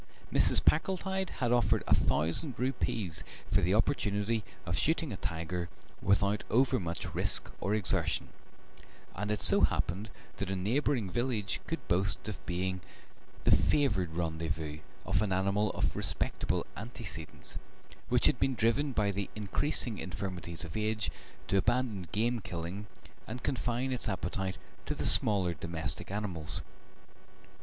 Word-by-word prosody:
Mrs. - - +6
Packletide 190 +3 +1
had 120 -2 -1
offered 120 -1 +3
a - - +3
thousand 110 - +1
rupees 115 - -1 0.3
for - - +4
the 90 +4 +2
opportunity 110 -2 +1 0.2
of 85 -1 -1
shooting 155 - +1
a - - -5
tiger 85 +1 -3 0.3
without 100 +1 +2
overmuch 115 -8 +1
risk - - 0
or 100 +2 +1
exertion, 90 -6 +2 0.9
and 105 +3 -3
it 105 -1 0
so - - +9
happened 100 +7 +1 0.3
that 100 - -3
a 95 - -1
neighbouring 115 +1 0
village 115 -4 -1
could 165 - -4
boast 95 +5 +1
of 105 -3 -6
being 95 +1 -1 0.6
the - - +6
favoured 95 - +1
rendezvous 80 -2 -3 0.3
of - - +1
an 105 -3 0
animal 100 +3 +1
of - - -1
respectable - - -1
antecedents, 100 - -7 0.5
which - - +3
had - - +3
been 135 -1 +1
driven 130 +5 +1
by 105 -3 +2
the 100 0 -3
increasing 110 +2 0
infirmities 90 -3 -5
of 80 - -8
age 110 0 0 0.4
to 100 - +2
abandon 110 -3 0
game 115 +3 +1
killing 90 +2 -5 0.4
and 125 +3 -6
confine 125 0 -1
its 125 -3 0
appetite 95 0 -2 0.3
to - - -1
the - - -2
smaller 95 -5 +5
domestic 85 -1 -3
animals. 95 -7 -3
100 Hz, 135 wpm, -31 LUFS, 90-120 Hz, 0.9 s, so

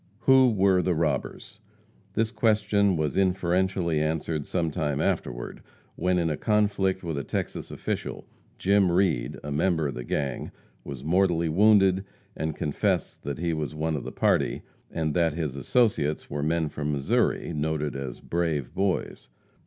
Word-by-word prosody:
Who 130 0 +6
were 95 -3 +3
the 90 0 0
robbers? 80 +6 -2 0.6
This 115 0 +1
question 105 -5 +2
was 75 -3 -1
inferentially 90 -3 +1
answered 75 -1 -2
sometime 80 -4 -1
afterward, - - -2 0.3
when, 90 0 +1
in 85 -2 +1
a 75 - -2
conflict 100 -3 +1
with 80 -4 -2
a - - -4
Texas - - -4
official, - - -4 0.3
Jim 100 -2 +3
Reed, 85 -9 +1
a 75 - -5
member 80 0 +1
of - - -5
the 60 - -6
gang, 70 +2 -2 0.3
was 70 -2 -7
mortally 85 0 +2
wounded, 95 +1 +4 0.3
and 80 -1 -3
confessed 75 -2 -1
that 70 0 -3
he 85 0 -1
was 75 -1 -3
one 80 +1 -1
of 70 - -4
the - - -6
party, - - +1 0.3
and 80 -2 -2
that 85 -3 +1
his 75 -5 -3
associates 75 - +1
were 75 +1 -2
men 80 +1 +1
from 75 0 -3
Missouri, 70 +4 0
noted 75 -1 -2
as 70 -2 -6
"brave 80 -6 -2
boys." 95 -9 -2
85 Hz, 155 wpm, -26 LUFS, 75-95 Hz, 0.6 s, Who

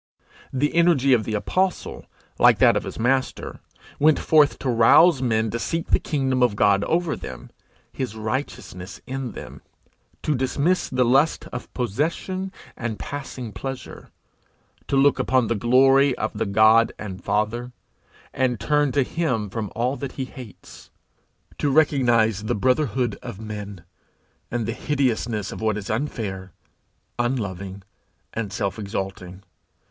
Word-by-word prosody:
The 140 +3 0
energy 165 -6 +4
of 115 -3 +2
the 110 - -2
apostle, 185 - -1 0.3
like - - +6
that - - +5
of - - -1
his - - -7
master, 130 +3 -1 0.4
went 155 +1 +5
forth 150 -2 +4
to - - -5
rouse 130 +7 +6
men 110 -3 +1
to 115 - -3
seek 165 +6 -3
the - - +5
kingdom 135 -4 -1
of 120 -4 +3
God 100 -1 +3
over 170 -1 0
them, 65 -2 -9 0.4
his 125 -5 -4
righteousness 110 -5 -5
in 130 -3 -4
them; - - -9 0.6
to 155 - +1
dismiss 140 +7 0
the 130 -1 +2
lust 135 +6 +2
of 125 - -6
possession 165 - -2 0.2
and 115 -2 -4
passing 130 -2 -6
pleasure; 135 +2 -7 0.8
to - - 0
look 140 +1 +4
upon 130 -2 +2
the 115 - 0
glory 135 +4 +4
of 110 - -2
the - - -2
God 110 +3 +5
and 95 -4 -7
Father, 110 +4 -1 0.6
and 125 -3 0
turn 145 +3 +2
to 140 - +3
him 125 - -2
from 105 -1 -4
all 125 +4 0
that 140 -2 -6
he 135 - -4
hates; 125 -5 -12 0.7
to 145 - +1
recognize 120 -8 +3
the - - 0
brotherhood 125 -1 0
of 95 - -8
men, 105 -4 -7 0.7
and 120 -2 -2
the 115 - -2
hideousness 120 -6 -1
of - - -7
what 110 -1 0
is 105 -1 -5
unfair, 105 - -4 0.7
unloving, 100 -6 -3 0.5
and 110 -3 -3
self 100 0 -2
exalting. 95 -2 -5
120 Hz, 145 wpm, -23 LUFS, 105-135 Hz, 0.8 s, like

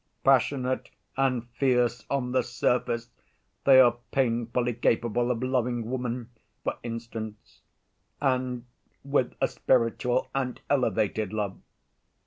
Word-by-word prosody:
Passionate 130 -1 +2 0.3
and 130 -3 +1
fierce 125 -1 +1
on 130 -3 -1
the 130 0 +3
surface, 120 -1 -1 0.5
they 135 -1 +8
are 120 -2 +6
painfully 120 -1 0
capable 120 +1 +1
of 125 0 -1
loving 125 -2 0
woman, 125 -2 -3 0.3
for - - -2
instance, 115 -2 -7 0.6
and 130 -3 0 0.4
with 140 -2 0
a - - +3
spiritual 125 0 +1
and 130 -2 -2
elevated 110 -6 +1
love. 105 -3 -2
125 Hz, 110 wpm, -27 LUFS, 115-130 Hz, 0.6 s, they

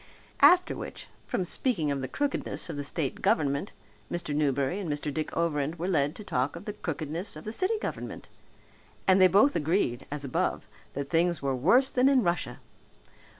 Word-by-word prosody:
After 360 0 +6
which, - - -8 0.2
from 185 - -1
speaking 175 - 0
of 140 -1 -2
the 130 - -3
crookedness 285 - -2
of - - -6
the 145 - -3
state 140 -1 -2
government 140 +5 +1 0.4
Mr. 170 -3 -3
Newberry 140 +3 +1
and 185 -5 -4
Mr. 145 0 -3
Dick 155 +1 -3
Overend 155 -2 0
were 170 +2 -3
led 150 -4 +1
to 210 - -8
talk 130 -6 -1
of 170 +4 -9
the 210 - -4
crookedness 165 +1 -4
of 155 - -9
the 215 - -5
city 380 - 0
government! - - -5 0.8
And 190 0 +5
they 185 - +9
both 210 +10 +4
agreed, 155 -6 0
as 145 -1 -4
above, 130 - -1 0.3
that 140 0 -5
things 170 -2 +1
were 135 -1 0
worse 240 - +4
than 255 +2 +4
in 265 -3 +4
Russia. 175 -1 -1
165 Hz, 185 wpm, -28 LUFS, 145-200 Hz, 0.8 s, they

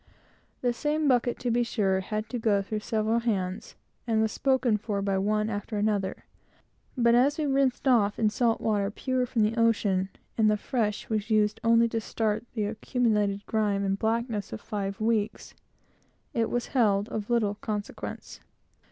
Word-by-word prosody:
The 245 -1 +1
same 300 +4 0
bucket, 245 -2 +2
to 245 - 0
be 240 +1 +2
sure, 200 -5 +1
had 215 +3 -3
to 245 - -3
go 205 -3 +2
through 215 +2 -3
several 220 +1 0
hands, 200 -3 -2 0.3
and 225 -2 +2
was 220 0 +1
spoken 260 -5 +2
for 210 -1 -3
by 195 -1 0
one 210 +2 +1
after 210 0 -4
another, 205 -2 -1 0.7
but 235 -1 +4
as 265 +5 +4
we 310 - 0
rinsed 270 -1 +1
off 210 -5 +3
in 215 -2 +2
salt 230 +1 +1
water, 205 -2 +1
pure 255 +3 -1
from 230 -2 +1
the 215 +2 +1
ocean, 205 -4 +2 0.3
and 215 -1 +5
the 210 - +2
fresh 210 -1 -2
was 215 0 -2
used 215 -1 +2
only 230 0 +5
to 225 0 -2
start 220 0 -1
the 215 -3 0
accumulated 210 -2 0
grime 205 -2 0
and 195 0 -1
blackness 225 -2 -1
of 110 - -5
five 200 -2 -4
weeks, 220 -1 -1 0.8
it 230 -1 0
was 245 0 -2
held 210 -5 +3
of 210 0 -4
little 225 -4 +2
consequence. 210 0 -6
220 Hz, 170 wpm, -27 LUFS, 205-235 Hz, 0.8 s, and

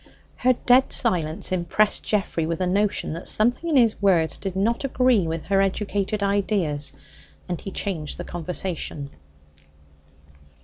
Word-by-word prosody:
Her 255 +1 +3
dead 250 +2 +3
silence 165 -9 +1
impressed 185 +4 +1
Geoffrey 190 -6 -1
with 165 0 -2
the 185 - -1
notion 195 -1 0
that 170 - -6
something 245 +10 +1
in 310 - +1
his 230 -5 +3
words 175 -5 +3
did 190 -2 -5
not 225 +7 0
agree 255 -8 +2
with 160 0 -4
her 195 +2 +2
educated 200 +1 -1
ideas, 195 -8 0 0.5
and 175 -2 -4
he - - -6
changed 180 -6 -4
the 175 - -5
conversation. 175 -4 -4
195 Hz, 140 wpm, -24 LUFS, 170-215 Hz, 0.5 s, Her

